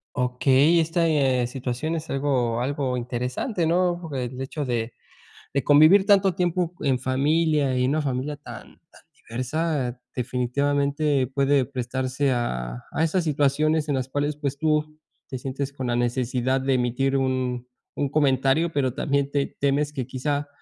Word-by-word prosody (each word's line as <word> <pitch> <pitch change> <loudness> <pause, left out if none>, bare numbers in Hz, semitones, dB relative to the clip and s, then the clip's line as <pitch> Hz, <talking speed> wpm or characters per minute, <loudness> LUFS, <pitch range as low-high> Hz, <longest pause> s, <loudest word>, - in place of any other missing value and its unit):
Okey, 135 +5 +3
esta, 165 +1 +1
eh, 135 -5 +2
situación 130 +5 -3
es 160 0 -5
algo 130 -4 0
algo 130 -1 -1
interesante, 125 - -2
¿no? 175 -1 0
El 125 0 -4
hecho 140 +2 -4
de 120 -2 -2 0.6
de 140 - +1
convivir 155 +7 +6
tanto 195 -3 +4
tiempo 175 -1 0
en 130 -3 +1
familia 140 +1 +1
y 125 - +2
en 130 - +2
una 155 +1 +1
familia 140 +2 -2
tan 145 - -12
tan - - -19 0.3
diversa 130 +1 -2 0.2
definitivamente 140 +2 0
puede 140 0 +2
prestarse 130 +1 -2
a 60 - -3
a 160 - 0
esas 175 +3 +1
situaciones 150 +1 +1
en 145 - +1
las 130 -1 -2
cuales 145 +2 -1
pues, 140 -2 -3
tú 155 0 0 0.3
te 130 - -5
sientes 135 +2 -4
con 130 -2 -5
la 120 0 0
necesidad 125 +2 0
de 135 0 +1
emitir 130 +2 +1
un 130 -2 -1 0.3
un 145 - -1
comentario, 140 +3 +2
pero 135 -3 0
también 140 0 0
te 140 -1 -2
temes 145 +1 +1
que 130 -5 -4
quizá 145 +2 -2
140 Hz, 155 wpm, -24 LUFS, 125-150 Hz, 0.6 s, convivir